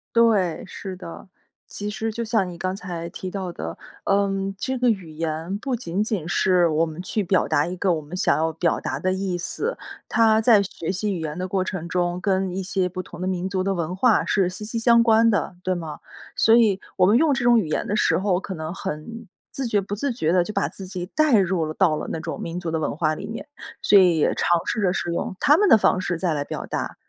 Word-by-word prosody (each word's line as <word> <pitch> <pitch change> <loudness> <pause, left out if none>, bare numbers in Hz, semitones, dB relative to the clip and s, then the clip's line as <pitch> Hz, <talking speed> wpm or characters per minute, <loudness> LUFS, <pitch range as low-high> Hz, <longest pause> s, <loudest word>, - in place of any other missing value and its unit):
对， 210 -8 +3
是 190 0 -7
的。 180 +1 -10 0.4
其 205 0 -5
实 220 +1 -3
就 235 +1 -3
像 220 -5 0
你 175 - -9
刚 185 +2 -2
才 175 -3 -6
提 185 - -6
到 185 -1 -4
的， 80 - -6 0.3
嗯， 195 0 0
这 260 +6 -2
个 250 0 +2
语 190 -7 -2
言 160 +4 -3
不 260 +2 -2
仅 195 -5 -3
仅 210 -7 -2
是 180 0 +3
我 160 +1 +2
们 160 +1 -7
去 200 +3 -2
表 185 -1 +2
达 145 - +2
一 180 - -4
个 185 +1 +1
我 160 -2 0
们 150 +4 -9
想 185 - +2
要 160 +1 0
表 165 +1 0
达 130 - -3
的 185 +6 0
意 190 -1 -2
思。 445 - -3 0.3
它 220 -1 +4
在 220 -2 +5
学 170 -4 -6
习 200 +2 -2
语 180 - -3
言 155 -1 -4
的 180 - -2
过 185 +1 -1
程 180 -3 -4
中， 175 0 -1
跟 190 -1 +1
一 190 - -2
些 185 0 0
不 185 +1 -5
同 175 - -12
的 185 - -2
民 185 0 -2
族 190 0 -1
的 195 +1 0
文 170 -1 -3
化 215 +4 +3
是 195 -3 +2
息 185 +3 -8
息 230 +2 -3
相 235 0 +5
关 230 0 +5
的， 200 -4 -1
对 185 0 -1
吗？ 160 -3 -6 0.4
所 225 - +5
以 215 -5 +4 0.2
我 180 - +4
们 210 +5 +5
用 305 +1 +3
这 265 -1 -1
种 240 -1 +5
语 190 - -2
言 155 - -1
的 210 - -1
时 - - +3
候， 190 -1 +1
可 190 -1 -6
能 160 +1 -5
很 190 +6 -6 0.2
自 270 -2 -2
觉 210 -3 +1
不 195 +1 -6
自 250 +6 -1
觉 165 -9 0
地 180 -1 +3
就 215 - -6
把 145 - 0
自 190 +2 -10
己 180 -1 -5
带 300 +2 +3
入 185 -4 +1
了 155 - -4
到 160 -3 +2
了 - - -5
那 - - -3
种 - - -5
民 170 +1 -5
族 175 -2 -3
的 160 - -1
文 150 - -2
化 155 0 +1
里 200 - -6
面， 225 +5 -6 0.4
所 205 - +6
以 180 -3 +4
也 - - +2
尝 175 -1 +2
试 235 - -2
着 185 -3 +2
是 175 - -2
用 170 - -3
他 295 +3 +5
们 415 - +3
的 225 - +8
方 195 - +2
式 175 -2 -2
再 170 -1 0
来 145 -1 -2
表 - - -5
达， - - -4
185 Hz, 275 characters per minute, -23 LUFS, 170-210 Hz, 0.4 s, 的